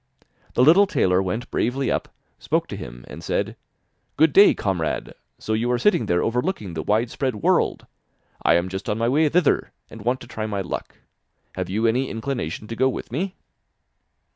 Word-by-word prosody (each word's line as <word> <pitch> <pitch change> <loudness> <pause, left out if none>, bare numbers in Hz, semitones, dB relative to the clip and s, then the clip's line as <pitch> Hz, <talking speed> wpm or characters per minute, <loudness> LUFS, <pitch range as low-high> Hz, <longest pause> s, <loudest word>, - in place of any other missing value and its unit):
The 125 - +4
little 180 +8 +7
tailor 95 - +2
went 105 +6 -3
bravely 130 +4 0
up, - - -2 0.3
spoke - - 0
to - - -5
him, - - -9
and - - -9
said: - - -1 0.6
'Good 160 -2 +4
day, 205 - +7
comrade, 90 -6 -2 0.2
so 110 - -3
you 115 +3 0
are 125 - +2
sitting 120 - +2
there 90 -1 +2
overlooking 120 - -1
the 80 - -3
wide 110 +7 +1
spread 130 -4 -1
world! 105 - +1 0.6
I 85 - +4
am 85 +1 +1
just 95 +1 -5
on 105 - 0
my 115 +1 +1
way 150 +5 +3
thither, 170 -1 +2 0.2
and 110 - -10
want 125 +4 0
to 120 - -10
try 110 -3 -4
my 100 -2 -2
luck. 90 - -5 0.6
Have 95 -1 -4
you 110 +4 0
any 125 +4 +1
inclination 115 - -4
to 115 - -4
go 130 +3 +3
with 130 - -6
me? 180 +9 -2
115 Hz, 190 wpm, -23 LUFS, 95-135 Hz, 0.6 s, little